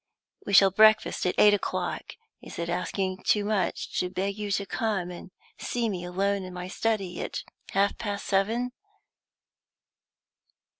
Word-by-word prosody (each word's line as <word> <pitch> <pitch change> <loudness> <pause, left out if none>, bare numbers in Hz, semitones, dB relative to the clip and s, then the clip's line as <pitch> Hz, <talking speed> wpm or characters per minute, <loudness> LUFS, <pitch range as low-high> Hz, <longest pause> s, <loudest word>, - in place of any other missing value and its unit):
We 200 - -2
shall 195 -1 +7
breakfast 215 -1 +4
at 180 - 0
eight 210 0 +7
o'clock. 205 - -2 0.3
Is - - -10
it 170 0 -3
asking 185 +2 -2
too 205 +2 +2
much 205 -4 -1
to 180 - 0
beg 195 +2 -2
you 210 -1 -4
to 200 0 0
come 195 -3 -2
and 175 - -9 0.3
see 235 -2 -1
me 180 -4 -4
alone 195 +3 0
in 185 -1 -8
my 180 0 -5
study 195 -4 -1
at - - -4 0.3
half 200 +1 +2
past 205 -3 -4
seven?" 225 +6 +1
195 Hz, 150 wpm, -27 LUFS, 185-210 Hz, 0.3 s, shall